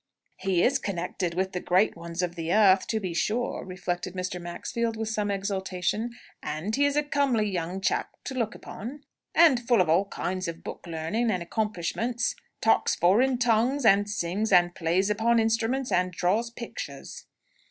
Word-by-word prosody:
"He 185 -2 +1
is 275 +2 +3
connected 180 -3 -3
with 190 +1 0
the 180 - -3
great 185 +4 +2
ones 170 +1 -4
of 175 -1 -2
the 165 -1 -4
earth, 195 -2 +5
to 220 - 0
be 185 -4 -4
sure!" 220 +8 -1
reflected 180 0 -4
Mr. 180 -1 -3
Maxfield, 220 +6 -3
with 220 0 -2
some 210 -2 -1
exultation. 195 +3 -2 0.3
"And 165 +9 -3
he 285 - +3
is 285 0 +1
a 295 - +3
comely 275 -7 +1
young 180 0 -3
chap - - 0
to 270 - -5
look 235 -3 -2
upon, 270 +8 -8 0.3
and 320 -7 +6
full 240 -1 +2
of 180 -3 +3
all 175 +5 +4
kinds 185 -1 -3
of 165 0 -6
book - - -8
learning 170 +9 -1
and 185 -5 0
accomplishments 220 +5 -1 0.3
talks - - +3
foreign 245 +9 +3
tongues, 245 +3 +2
and 205 0 +5
sings, 205 +2 -1
and 175 0 +5
plays 180 +5 +1
upon 230 +3 +2
instruments, 230 +4 0
and 180 0 +2
draws 190 +7 0
pictures!" 235 0 -8
200 Hz, 175 wpm, -27 LUFS, 180-235 Hz, 0.3 s, and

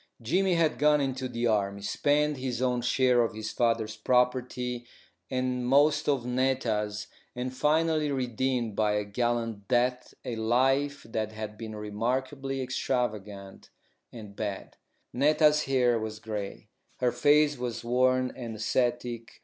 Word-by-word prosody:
Jimmy 180 +10 +1
had 165 -2 +1
gone 150 0 +4
into 130 -2 -2
the 120 0 -2
army, 100 -3 0
spent 150 +5 +1
his 130 -2 -3
own 125 -1 +1
share 125 0 +3
of 115 -2 -1
his 110 0 -4
father's 115 -2 0
property 125 +1 0 0.4
and 130 -1 -1
most 145 +3 +4
of 135 -4 +1
Netta's, 120 -5 0 0.3
and 125 +1 -3
finally 155 +1 +2
redeemed 125 -3 -1
by 105 -1 +2
a 105 0 0
gallant 115 -1 -2
death 125 +1 0
a 120 - -3
life 135 +5 +1
that 110 -1 -3
had 110 -1 -6
been 110 0 -7
remarkably 130 +6 -2
extravagant 105 -6 -3 0.4
and 105 -4 -10
bad. 100 -2 -5 0.4
Netta's 150 +2 +4
hair 125 -3 +2
was 110 0 -5
grey; 105 -3 -6 0.3
her 125 -1 +1
face 145 +4 +4
was 120 -3 -4
worn 130 +1 +2
and 115 -3 -6
ascetic. 120 +1 -2
125 Hz, 135 wpm, -28 LUFS, 110-135 Hz, 0.4 s, gone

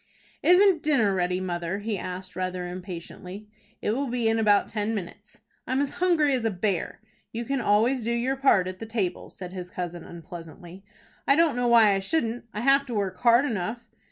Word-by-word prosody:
"Isn't 365 -2 +5
dinner 240 -10 +2
ready, 180 0 0
mother?" 175 0 -3
he 210 +1 -3
asked, 185 0 -6
rather 185 -1 -3
impatiently. 180 +2 -8 0.4
"It - - +1
will 270 +5 -1
be 240 -2 -1
in 225 0 +2
about 205 -2 +3
ten 215 +1 -2
minutes." 205 +3 -8 0.3
"I'm 260 +2 0
as 280 -1 0
hungry 320 -6 +3
as 250 -3 0
a 225 - +2
bear." 195 -2 -2 0.3
"You 235 +1 -4
can 275 +1 -1
always 230 +4 +2
do 230 - -2
your 240 +3 0
part 265 -9 +3
at 185 0 -6
the 225 - -7
table," 215 -5 -3
said 180 -1 -9
his 180 -1 -6
cousin 175 -2 -5
unpleasantly. 170 +2 -11 0.4
"I 275 - +5
don't 325 -3 +3
know 245 0 0
why 225 -3 +6
I 195 - +1
shouldn't. 235 +1 -1
I 210 - -4
have 275 +2 +4
to 240 - -4
work 195 -3 -2
hard 240 +3 +5
enough." 220 -2 -2
215 Hz, 195 wpm, -26 LUFS, 185-245 Hz, 0.4 s, why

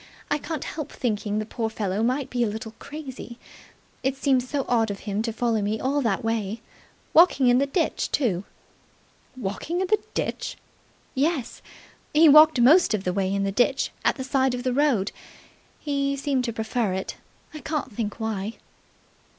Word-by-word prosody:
"I 295 - +2
can't 315 -1 -4
help 305 -3 -5
thinking 210 -3 -2
the 215 - -1
poor 225 0 -3
fellow 210 -2 -2
may 255 +4 +1
be 245 0 -3
a - - +1
little 220 +1 -6
crazy. 275 -5 -8 0.6
It 265 +1 0
seems 260 -2 +1
so 285 -2 -1
odd 225 -3 +2
of 200 -1 -5
him 205 0 -2
to 230 +1 -2
follow 230 -1 0
me 210 +2 -1
all 280 +2 0
that 225 -5 0
way. 225 -1 -2 0.5
Walking 310 -6 +6
in 245 +1 +5
the 280 - +1
ditch 325 +4 0
too!" 205 -10 +1 0.9
"Walking 255 - -3
in 380 - +1
the 425 +3 +2 0.2
ditch!" - - -3 0.6
"Yes. 280 -2 -1 0.5
He 320 +2 +7
walked 305 -1 +8
most 275 +1 +6
of 195 - -4
the 180 - -1
way 190 0 0
in 200 0 0
the 195 - 0
ditch 250 +6 +1
at - - +3
the 260 - -5
side 265 -1 +1
of 245 - -5
the 255 -1 0
road. 260 -8 +2 0.7
He 280 -1 -1
seemed 270 -2 0
to 235 - -1
prefer 220 -2 -1
it. 190 0 -4 0.4
I 305 - -7
can't 300 -4 -3
think 210 0 -4
why." 220 -1 -3
245 Hz, 180 wpm, -25 LUFS, 215-280 Hz, 0.9 s, walked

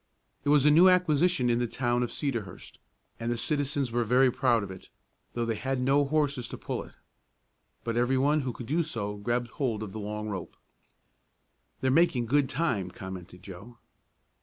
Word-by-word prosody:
It - - -1
was 145 -1 +5
a 150 - +7
new 175 +5 +7
acquisition 175 -5 +3
in 120 0 +2
the 120 - 0
town 120 0 0
of 120 - -2
Cedarhurst, 120 -9 -5 0.4
and 115 +1 -2
the 120 - -1
citizens 140 -1 -1
were 120 +1 +1
very 125 +3 +4
proud 120 -3 +2
of 95 - -6
it, 95 - -12 0.5
though 120 -1 0
they 115 - 0
had 130 +4 -2
no 135 +3 +3
horses 140 -4 0
to - - -6
pull - - -4
it. - - -16 0.9
But 115 0 -2
everyone 135 +5 +2
who 130 -2 -3
could 120 - -8
do 155 +8 +1
so 110 -10 -3
grabbed 120 +3 -1
hold 115 -5 -2
of 105 - -7
the 110 - -6
long 105 +1 -4
rope. 95 -4 -6 1.3
"They're 130 - +2
making 135 -5 +3
good 135 +2 +2
time," 125 - -1
commented 90 -1 -9
Joe. 100 +5 -11
120 Hz, 185 wpm, -28 LUFS, 110-140 Hz, 1.3 s, a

